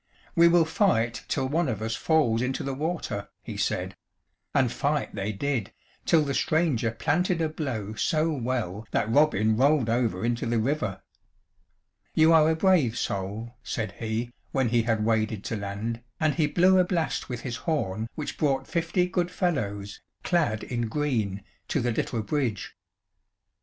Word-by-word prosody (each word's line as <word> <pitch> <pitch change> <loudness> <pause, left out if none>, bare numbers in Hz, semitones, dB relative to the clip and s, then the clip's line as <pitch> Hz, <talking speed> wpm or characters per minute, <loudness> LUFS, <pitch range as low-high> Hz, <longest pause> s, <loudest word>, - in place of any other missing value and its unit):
"We 170 -1 +7
will 170 -1 +5
fight 120 - +1
till 135 -2 0
one 160 +2 +1
of 110 -4 -2
us 110 +1 -2
falls 135 -9 +2
into 130 +1 -1
the 135 - -2
water," 150 - -3
he - - -7
said; - - -1 0.6
and 130 -4 +2
fight 145 +2 -1
they 100 +1 -2
did, 120 +1 -2 0.3
till 160 -2 +5
the 140 -1 -2
stranger 155 -7 +1
planted 160 +10 0
a 160 - +1
blow 130 -10 -4
so 155 +8 +1
well 115 -6 -3
that 110 0 0
Robin 110 -6 +3
rolled 135 -1 +3
over 115 -4 0
into 120 0 -1
the 115 0 +1
river. 110 -5 -1 1.1
"You 160 +1 +6
are 160 -1 +6
a 160 - +2
brave 160 - +3
soul," 100 +5 -3
said 110 -4 -3
he, 115 +2 -3 0.2
when 130 -4 +1
he 120 0 +3
had 110 -2 0
waded 110 -2 0
to - - -3
land, 105 +3 -4 0.2
and 155 -2 +2
he 155 -3 +2
blew 185 +4 +4
a - - +6
blast 175 -6 -1
with 120 -2 -4
his 125 -2 -4
horn 115 - -2
which 150 - -5
brought 135 -3 +1
fifty 170 +3 0
good 180 -1 0
fellows, 105 - -2 0.2
clad 155 - +1
in 120 -2 -2
green, 110 -8 -1 0.2
to 145 - 0
the 120 -1 0
little 110 0 -2
bridge. 125 -5 -2
125 Hz, 165 wpm, -27 LUFS, 110-155 Hz, 1.1 s, We